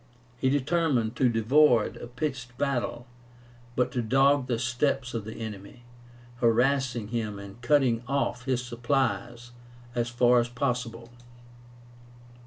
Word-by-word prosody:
He 130 - +2
determined 135 -4 +1
to 125 -2 +3
avoid 125 0 +4
a - - -8
pitched 125 -1 -5
battle, 130 -3 -2 0.7
but 125 - +1
to 125 - -1
dog 135 +3 +3
the 120 -2 0
steps 125 +2 -1
of 115 -3 -4
the 110 - -7
enemy, 110 +1 -8 0.5
harassing 120 -1 +1
him 110 -3 -3
and 100 +3 -11
cutting 120 -3 +3
off 130 -2 -1
his 125 -2 0
supplies 120 -1 -2 0.4
as 120 -1 -1
far 120 0 +4
as 120 0 -1
possible. 120 -2 -3
120 Hz, 125 wpm, -27 LUFS, 115-135 Hz, 0.7 s, avoid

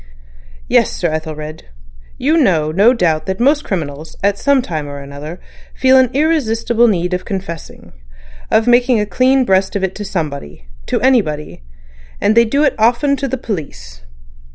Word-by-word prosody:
"Yes, - - +3
Sir 170 - -2
Ethelred. 155 0 -6 0.5
You 300 +5 +1
know 170 - +2
no 200 +8 +4
doubt 165 -10 0
that 190 0 -3
most 285 +5 +2
criminals 155 -4 -5
at 200 0 +1
some 280 -2 +2
time 155 -7 -4
or 140 0 -7
other 145 +5 -9 0.4
feel 260 0 +4
an 260 -2 +5
irresistible 240 -6 +2
need 180 -4 0
of 180 - -2
confessing—of - - -5
making 245 -1 +4
a 210 - 0
clean 255 +6 +2
breast 190 -2 +1
of 200 - -1
it 190 -1 -1
to 210 - -7
somebody—to 75 - -5
anybody. 160 - 0 0.6
And 215 - +2
they 235 0 +6
do 280 +6 +1
it 285 - +3
often 245 +6 +2
to 275 - -2
the 265 +1 -3
police. 60 - -7
190 Hz, 155 wpm, -16 LUFS, 155-245 Hz, 0.6 s, they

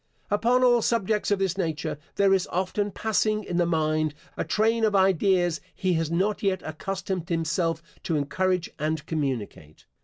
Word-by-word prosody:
Upon 240 +5 +3
all 240 -2 +5
subjects 215 -2 +1
of 205 - +3
this 190 -1 -1
nature, 155 -3 -2 0.2
there 195 -1 +4
is 190 -2 +1
often 190 +3 -1
passing 215 +1 0
in 175 -3 -3
the 175 -1 +2
mind, 155 -2 0 0.2
a - - -1
train 225 +2 +1
of 215 -2 +3
ideas 185 -3 +3
he 185 -2 0
has 165 -2 0
not 190 +5 0
yet 190 -2 0
accustomed 185 +2 -4
himself 165 0 0 0.2
to 165 - 0
encourage 180 +5 0
and 155 0 -1
communicate. 125 - -4
185 Hz, 160 wpm, -26 LUFS, 160-200 Hz, 0.2 s, all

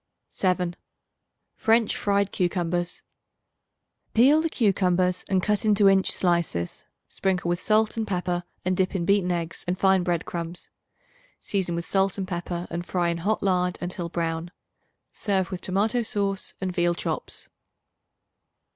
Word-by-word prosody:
7. 180 -2 0 0.8
French 225 -1 +3
Fried 200 -1 +1
Cucumbers. 175 -1 -1 1.1
Peel 275 +7 +6
the 330 - 0
cucumbers 185 - +2
and 185 -2 +2
cut 210 -2 +1
into 210 -2 +4
inch 195 -1 +4
slices. 170 - 0 0.2
Sprinkle 185 -3 -1
with 175 0 0
salt 215 +1 +2
and 220 -1 -1
pepper 180 -1 -1 0.2
and 185 0 +1
dip 190 +1 0
in 170 -3 0
beaten 195 -1 +2
eggs 170 -1 -3
and 180 +1 0
fine 190 0 +4
bread 175 -2 -1
crumbs. 170 0 -5 0.7
Season 185 -4 -1
with 170 0 -3
salt 195 0 +1
and 190 -2 -3
pepper 175 0 -4
and 170 +1 -3
fry 175 -1 0
in 170 0 -2
hot 205 +5 0
lard 180 -2 +1
until 175 -1 -4
brown. 165 0 -2 0.6
Serve 190 -3 0
with 185 - -4
tomato 210 +6 +1
sauce 200 -3 -1
and 185 -1 -2
veal 175 -1 +1
chops. - - -3
185 Hz, 145 wpm, -25 LUFS, 175-200 Hz, 1.1 s, Peel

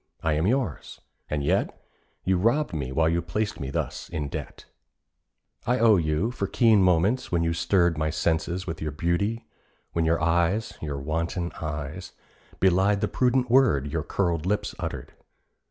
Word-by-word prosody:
I 80 - +2
am 80 +4 +1
yours: 125 - -2 0.3
and 75 -1 -1
yet 70 - 0 0.4
You 95 -1 +1
robbed 115 - +1
me 70 -5 -3
while 80 +4 +2
you 85 +1 +1
placed 105 +6 -3
me 65 - -4
thus - - -4
in 75 -2 -3
debt. - - -7 1.0
I 125 +1 +3
owe 115 -4 +5
you 80 +7 0
for 100 -6 -3
keen 110 -1 +4
moments 95 +8 +2
when 85 -2 +1
you 85 0 +1
stirred 85 -2 +2
My 75 0 0
senses 80 +4 -1
with 80 -3 -5
your 75 -1 -2
beauty, 100 +9 -1 0.5
when 85 - +1
your 80 +1 +2
eyes 85 +6 +1
(Your 75 -3 -3
wanton 85 +5 -2
eyes) 75 +3 -5 0.5
belied 95 +2 +3
the - - +1
prudent 125 -1 +1
word 105 - +4
Your 80 - 0
curled 85 -1 -1
lips 105 +1 -1
uttered. - - -5
85 Hz, 165 wpm, -26 LUFS, 80-105 Hz, 1.0 s, owe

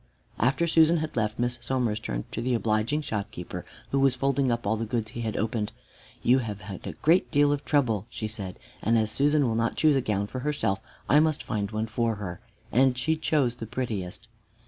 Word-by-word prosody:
After 135 +8 +2
Susan 165 0 +5
had 155 -1 -3
left, 110 -2 0
Miss 120 0 -1
Somers 120 -5 0
turned - - -3
to 115 - -3
the 125 +1 +1
obliging 115 +6 +1
shopkeeper 105 -7 -4 0.3
who 140 - +2
was 135 -1 +4
folding 135 -1 +1
up 120 0 -1
all 105 +2 +2
the 110 - -2
goods 110 -1 -2
he 120 - -5
had 110 -2 -2
opened. 110 -1 -1 0.5
"You 125 +2 +5
have 105 -4 -5
had 95 -2 -8
a - - -4
great 165 +4 +3
deal 145 0 +4
of 145 -1 -1
trouble," 115 -8 +1
she 110 -2 -4
said, 100 -4 -7 0.2
"and 115 +2 +3
as 110 -1 +2
Susan 145 +2 +3
will 115 - 0
not 115 +1 0
choose 155 -2 +4
a 135 - +2
gown 105 -4 0
for 130 +5 -5
herself, 140 -8 -1 0.3
I 145 - +6
must 155 -1 +2
find 105 -3 -2
one 110 +1 -2
for 115 0 0
her," 90 -4 -6 0.3
and 130 +2 +4
she 160 +6 +1
chose 145 -6 +1
the 115 - -6
prettiest. 105 -7 -4
115 Hz, 215 wpm, -27 LUFS, 110-140 Hz, 0.5 s, I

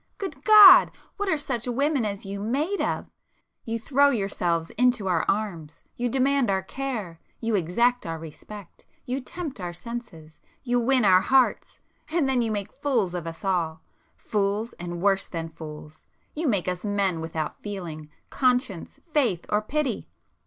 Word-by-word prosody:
Good 300 -9 -6
God!—what 410 -1 +7
are 320 - +2
such 260 -5 -3
women 275 +1 +1
as 200 -1 -4
you 200 +1 -5
made 285 - -1
of? - - -1 0.6
You 230 0 -2
throw 280 +5 +3
yourselves 180 -8 -1
into 245 -4 +1
our 175 -3 +1
arms,—you 200 +3 -3
demand 270 0 +2
our 190 -1 +1
care—you 225 -3 -5
exact 215 +6 +1
our 165 0 -3
respect—you 205 - -9
tempt 290 - -7
our 175 -1 -4
senses—you 235 - -6
win 250 -1 +2
our 185 -1 +6
hearts,—and 270 - 0
then 260 -2 +2
you 225 -2 -1
make 205 -1 -3
fools 230 -11 0
of 175 -2 -4
us 165 +4 -8
all! 165 -4 -1 0.3
Fools, 205 +2 -1
and 175 0 -5
worse 195 -1 +2
than 165 -2 -5
fools,—you 155 - -9
make 200 -8 +1
us 180 -1 -2
men 200 -5 0
without 160 -1 -4
feeling, 170 -7 -7 0.2
conscience, 250 -9 0
faith, 230 - +1
or 210 - +2
pity! 270 +1 -2
210 Hz, 140 wpm, -25 LUFS, 175-260 Hz, 0.6 s, God!—what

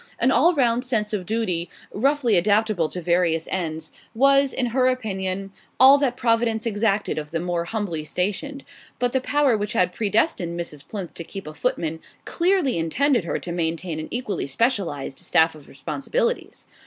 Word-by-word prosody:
An 255 +3 +2
all 330 +9 +4
round 245 -3 +2
sense 220 -5 -1
of 185 -4 -3
duty, 190 -7 -1 0.2
roughly 260 0 +2
adaptable 205 -2 +2
to 180 - -6
various 170 -1 +1
ends, 160 -4 -3 0.2
was, 275 +2 +4
in 255 - -1
her 255 +2 +2
opinion, 195 -6 -2 0.3
all 270 +3 +8
that 255 -3 0
Providence 230 -1 +1
exacted 205 -5 0
of 150 -1 -7
the 165 - -2
more 175 0 -2
humbly 180 -6 -3
stationed; 205 - -3 0.3
but 245 -1 0
the 265 - +1
power 285 -2 +2
which 210 +1 -2
had 180 -5 +2
predestined 200 - 0
Mrs. 150 -4 -6
Plinth 195 -5 -6
to 170 - -6
keep 195 +3 -8
a 155 - -8
footman 160 +1 -2 0.3
clearly 345 - +1
intended 240 - +1
her 160 - -1
to 175 - -6
maintain 165 -1 -2
an 155 - -5
equally 215 - -3
specialized 155 - -1
staff 160 0 +3
of 150 -2 -15
responsibilities. 470 - -3
205 Hz, 165 wpm, -23 LUFS, 170-250 Hz, 0.3 s, all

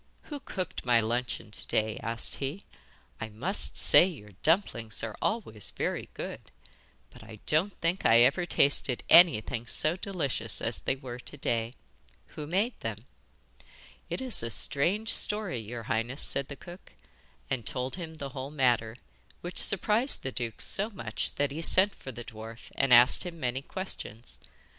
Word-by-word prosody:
'Who 295 -2 -8
cooked 185 -9 -5
my 120 -2 +3
luncheon 115 -1 -3
to - - -5
day?' 110 0 -1
asked 115 +1 0
he. 140 +8 -5 0.5
'I 110 - -6
must 145 - -1
say - - +9
your 120 - -10
dumplings 120 - 0
are 110 -2 -5
always 115 - -2
very - - -4
good; - - -8 0.6
but 125 - -15
I 110 -1 -12
don't 175 +7 0
think 170 +3 -1
I 115 +1 +5
ever 145 +8 +2
tasted 140 -5 +1
anything 130 -8 +5
so 155 +8 +3
delicious 145 - -2
as 115 - -2
they 130 - -1
were 125 -2 -9
to 145 - -7
day. 115 -2 -2 0.5
Who 150 -1 -8
made 200 +9 -1
them?' - - -6 1.0
'It - - -4
is 255 -3 +1
a 115 - -4
strange 180 - 0
story, 210 - +2
your 115 +2 -8
highness,' 115 +4 -2
said 140 -1 0
the 140 - -8
cook, 175 +5 -14 0.5
and 130 -3 -3
told 125 +5 -3
him 165 -3 -8
the 140 -3 -7
whole 135 0 -7
matter, 120 -6 0 0.5
which 175 +1 -5
surprised 215 +7 +2
the 130 - -4
duke 115 -3 -4
so 205 +3 +4
much 120 - -4
that 145 -1 -1
he 155 +3 -5
sent 190 +4 +5
for 130 - -10
the 120 0 -9
dwarf 115 0 -11
and 135 -1 0
asked 125 +1 +7
him 175 -2 -8
many 125 -1 -2
questions. 135 - -7
135 Hz, 165 wpm, -28 LUFS, 115-175 Hz, 1.0 s, say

